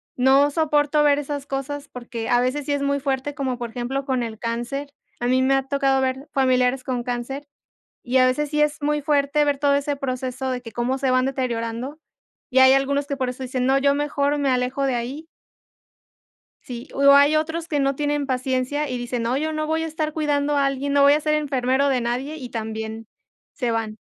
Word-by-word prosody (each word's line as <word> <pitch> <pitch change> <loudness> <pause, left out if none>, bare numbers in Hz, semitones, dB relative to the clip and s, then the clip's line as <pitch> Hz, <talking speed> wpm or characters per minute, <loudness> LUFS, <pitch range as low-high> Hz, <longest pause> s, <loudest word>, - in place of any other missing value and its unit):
"No 270 +3 +4
soporto 295 -1 +2
ver 290 -1 +4
esas 285 -1 -4
cosas", 280 +1 -5
porque 240 -2 -6
a 245 - +4
veces 265 +3 -1
sí 290 - -2
es 285 - -1
muy 280 0 0
fuerte, 275 +1 -2
como 265 -4 -2
por 240 -1 -5
ejemplo, 255 +3 -3
con 260 -3 0
el 220 -2 -6
cáncer. 240 +5 -4 0.3
A 240 - -1
mí 255 +1 +3
me 265 +1 +3
ha 270 - +1
tocado 270 -1 +2
ver 265 +2 -2
familiares 255 -1 +2
con 250 -2 -2
cáncer, 250 +4 -4 0.6
y 260 +1 +1
a 255 - +6
veces 285 +3 0
sí 300 0 0
es 300 0 0
muy 295 +1 +1
fuerte 290 0 +2
ver 290 -1 0
todo 285 0 +3
ese 285 +1 0
proceso 260 -1 -3
de 250 -1 -2
que 230 - -10
cómo 245 +4 -1
se 265 -1 0
van 255 0 +3
deteriorando, 250 +1 -3 0.5
y 260 - +2
hay 260 0 +8
algunos 280 +1 +1
que 280 - -3
por 260 -2 -1
eso 255 +1 -8
dicen: 255 0 -2
"No, 270 +1 +4
yo 280 +1 +3
mejor 290 0 0
me 280 -2 +1
alejo 255 +2 0
de 265 - +1
ahí". 255 +7 -4 1.4
Sí, 245 +2 -8
o 280 0 +5
hay 285 +2 +6
otros 320 +2 -2
que 295 -3 -1
no 275 0 +1
tienen 290 0 -1
paciencia 260 +3 -1
y 250 - -3
dicen: 240 -1 -3
"No, 235 +2 0
yo 310 +3 -1
no 310 0 -2
voy 320 +1 0
a 325 - -2
estar 310 -1 -3
cuidando 295 -2 0
a 280 -1 +3
alguien, 275 +1 -2
no 285 - +4
voy 280 +1 +7
a 300 - +2
ser 305 0 0
enfermero 275 -2 +1
de 260 -2 +1
nadie", 250 +6 -2
y 255 -5 -7
también 220 -1 -5 0.5
se 245 -4 -1
van. 220 -1 -2
270 Hz, 220 wpm, -23 LUFS, 250-290 Hz, 1.4 s, hay